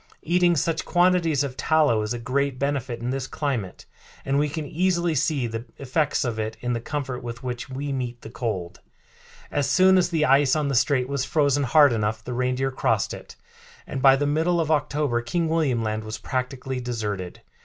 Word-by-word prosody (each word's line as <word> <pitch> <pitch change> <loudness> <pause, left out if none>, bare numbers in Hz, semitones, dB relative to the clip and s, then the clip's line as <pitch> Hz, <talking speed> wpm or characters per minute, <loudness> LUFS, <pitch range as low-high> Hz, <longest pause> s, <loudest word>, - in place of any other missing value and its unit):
Eating 175 +1 +3
such 165 +2 0
quantities 175 -5 +2
of 135 -3 -4
tallow 150 -9 +2
is 105 0 -3
a 120 - -1
great 130 +3 -1
benefit 135 -4 -2
in 120 +1 -2
this 135 -1 -3
climate, 125 -13 -3 0.4
and 135 +1 +1
we 150 0 +1
can 155 +1 -4
easily 175 +2 0
see 145 -2 0
the 115 0 -4
effects 140 +2 0
of 115 -2 -2
it 110 +1 -3
in 125 0 -2
the 115 - -2
comfort 135 -1 -4
with 120 +1 -7
which 125 0 -5
we 140 +2 -4
meet 125 -2 -4
the - - -8
cold." 100 -9 -4 0.7
As 140 -2 0
soon 185 +4 +5
as 180 - +1
the 160 -3 +1
ice 135 0 +4
on 150 -2 0
the - - -1
strait 130 0 +2
was 140 -1 -1
frozen 145 -1 +2
hard 145 +1 +5
enough 110 0 -1
the 125 - -5
reindeer 130 +2 0
crossed 130 - 0
it, - - -10 0.5
and 135 - -5
by 135 0 +7
the 145 +2 0
middle 160 +4 +1
of 160 -1 0
October 145 -4 0
King 165 +8 -1
William 150 -8 +1
Land 110 0 -2
was 110 0 -5
practically 130 +2 -3
deserted. 105 -7 -4
135 Hz, 195 wpm, -24 LUFS, 120-150 Hz, 0.7 s, by